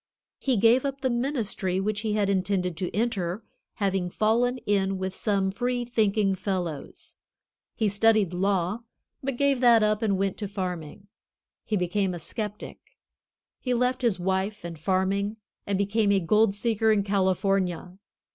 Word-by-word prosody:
He 260 Hz, -4 st, +1 dB
gave 230 Hz, +5 st, +5 dB
up 275 Hz, -1 st, -3 dB
the 260 Hz, -, +1 dB
ministry 235 Hz, -7 st, -1 dB
which 210 Hz, +2 st, -1 dB
he 215 Hz, -1 st, -1 dB
had 210 Hz, -2 st, +1 dB
intended 185 Hz, -2 st, 0 dB
to 180 Hz, +1 st, -2 dB
enter, 205 Hz, -3 st, -2 dB, 0.3 s
having 195 Hz, -3 st, 0 dB
fallen 235 Hz, +6 st, +1 dB
in 195 Hz, -1 st, +1 dB
with 190 Hz, 0 st, -3 dB
some 195 Hz, -2 st, 0 dB
free 245 Hz, +3 st, -1 dB
thinking 215 Hz, -4 st, +1 dB
fellows. 180 Hz, -6 st, -5 dB, 0.6 s
He 220 Hz, -, +1 dB
studied 205 Hz, -2 st, +3 dB
law, 190 Hz, +2 st, 0 dB, 0.4 s
but 270 Hz, -2 st, -3 dB
gave 280 Hz, -1 st, +2 dB
that 235 Hz, -3 st, +6 dB
up 215 Hz, +1 st, +1 dB
and 205 Hz, -4 st, +1 dB
went 195 Hz, 0 st, -1 dB
to 205 Hz, -, -4 dB
farming. 185 Hz, -2 st, -5 dB, 0.6 s
He 215 Hz, -, 0 dB
became 185 Hz, +1 st, 0 dB
a -, -, -6 dB
skeptic. 210 Hz, +4 st, -6 dB, 0.8 s
He 250 Hz, -2 st, -1 dB
left 250 Hz, +2 st, +1 dB
his 230 Hz, -7 st, +1 dB
wife 190 Hz, +2 st, -1 dB
and 170 Hz, -2 st, -7 dB
farming 195 Hz, +4 st, 0 dB, 0.3 s
and 200 Hz, -1 st, 0 dB
became 200 Hz, +1 st, +1 dB
a 200 Hz, -, +4 dB
gold 210 Hz, +3 st, +3 dB
seeker 220 Hz, 0 st, +2 dB
in 205 Hz, -2 st, +2 dB
California. 190 Hz, -2 st, 0 dB
200 Hz, 155 wpm, -26 LUFS, 190-225 Hz, 0.8 s, that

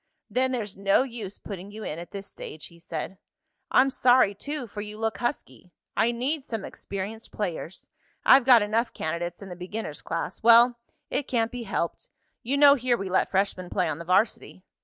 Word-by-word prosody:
"Then 260 Hz, +1 st, +2 dB
there's 215 Hz, -6 st, -3 dB
no 195 Hz, +5 st, +3 dB
use 230 Hz, -6 st, -7 dB
putting 195 Hz, -1 st, -8 dB
you 215 Hz, +1 st, -8 dB
in 155 Hz, -, -4 dB
at 170 Hz, -, -8 dB
this 200 Hz, 0 st, -7 dB
stage," 155 Hz, -5 st, -9 dB
he 170 Hz, -, -15 dB
said. 170 Hz, +3 st, -6 dB, 0.5 s
"I'm 270 Hz, +1 st, +4 dB
sorry, 245 Hz, -5 st, +4 dB
too, 285 Hz, +6 st, -5 dB
for 210 Hz, -2 st, -7 dB
you 210 Hz, 0 st, -7 dB
look 225 Hz, 0 st, -2 dB
husky. 240 Hz, -, -4 dB, 0.2 s
I 225 Hz, +2 st, +3 dB
need 265 Hz, +5 st, -1 dB
some 225 Hz, -6 st, -5 dB
experienced 200 Hz, +3 st, -7 dB
players. 180 Hz, -3 st, -4 dB, 0.4 s
I've 265 Hz, 0 st, +8 dB
got 240 Hz, -4 st, +7 dB
enough 225 Hz, +3 st, 0 dB
candidates 175 Hz, +3 st, -4 dB
in 195 Hz, -, -9 dB
the 180 Hz, -, -7 dB
beginner's 180 Hz, -2 st, -6 dB
class. 165 Hz, 0 st, -4 dB
Well, 235 Hz, +1 st, +6 dB, 0.3 s
it 285 Hz, -, -1 dB
can't 230 Hz, -2 st, 0 dB
be 245 Hz, -1 st, -5 dB
helped. 170 Hz, -, -2 dB, 0.3 s
You 270 Hz, +4 st, -1 dB
know 285 Hz, 0 st, +8 dB
here 250 Hz, -3 st, +1 dB
we 195 Hz, -3 st, -5 dB
let 190 Hz, -, +2 dB
freshmen 190 Hz, -2 st, -1 dB
play 185 Hz, -, 0 dB
on 145 Hz, -, -3 dB
the 170 Hz, -, -7 dB
varsity." 185 Hz, 0 st, +1 dB
210 Hz, 190 wpm, -26 LUFS, 185-245 Hz, 0.5 s, I've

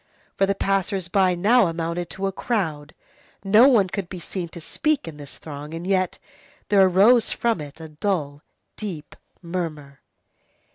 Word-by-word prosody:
For 195 Hz, -, +2 dB
the 200 Hz, -, +1 dB
passers 195 Hz, -2 st, -1 dB
by 185 Hz, -2 st, +3 dB
now 210 Hz, +4 st, +4 dB
amounted 170 Hz, +1 st, -3 dB
to 195 Hz, -, -4 dB
a 195 Hz, -, 0 dB
crowd. 160 Hz, -9 st, -3 dB, 0.5 s
No 215 Hz, +6 st, +6 dB
one 225 Hz, -8 st, +4 dB
could 195 Hz, -1 st, -5 dB
be 185 Hz, -, -7 dB
seen 175 Hz, 0 st, -5 dB
to 170 Hz, -, -9 dB
speak 295 Hz, -, -1 dB
in 155 Hz, -2 st, -8 dB
this 145 Hz, -2 st, -9 dB
throng, 150 Hz, +1 st, -8 dB
and 170 Hz, +1 st, -6 dB
yet 185 Hz, -1 st, 0 dB, 0.5 s
there 200 Hz, -2 st, +5 dB
arose 200 Hz, +6 st, +5 dB
from 230 Hz, -8 st, 0 dB
it 145 Hz, +1 st, -10 dB
a 160 Hz, -1 st, -9 dB
dull, 150 Hz, -4 st, -2 dB, 0.3 s
deep 180 Hz, -8 st, -7 dB, 0.3 s
murmur. 155 Hz, -5 st, -5 dB
180 Hz, 160 wpm, -23 LUFS, 160-195 Hz, 0.5 s, No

